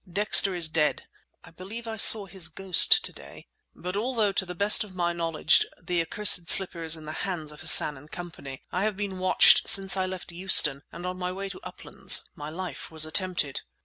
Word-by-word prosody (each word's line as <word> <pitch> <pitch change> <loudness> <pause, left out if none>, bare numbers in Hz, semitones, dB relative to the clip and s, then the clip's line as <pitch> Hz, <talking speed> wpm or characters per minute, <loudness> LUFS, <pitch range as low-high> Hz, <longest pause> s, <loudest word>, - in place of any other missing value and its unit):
Dexter 200 -1 +1
is 170 -2 +1
dead 155 -1 -2 0.4
(I - - -17
believe 205 +7 -10
I 225 - -6
saw 210 -1 +4
his 185 -4 -3
ghost 185 +1 +3
to - - -4
day). - - -14 0.3
But 180 +2 -8
although, 220 -1 -2
to 190 -1 -3
the 180 - -8
best 200 +4 +2
of 195 -3 -15
my 175 -1 -2
knowledge, 165 -2 +1 0.2
the 175 -1 -2
accursed 180 -1 +3
slipper 185 -3 +2
is 160 0 +1
in 155 -1 -13
the 155 - -8
hands 165 -6 -6
of 150 - -13
Hassan 150 -2 +5
and 145 +3 -17
Company, 165 -7 -11
I 185 - -3
have 215 -3 -4
been 200 -2 -6
watched 185 0 +4
since 195 -1 +1
I 190 -1 -2
left 185 -2 -9
Euston, 170 -6 +3
and 175 +2 -10
on 180 0 -6
my 180 0 -4
way 195 +1 -7
to 190 - -11
'Uplands' 180 +2 -3
my 150 0 -10
life 180 +3 -8
was 160 -1 +2
attempted!" 155 -4 0
180 Hz, 210 wpm, -25 LUFS, 165-195 Hz, 0.4 s, Hassan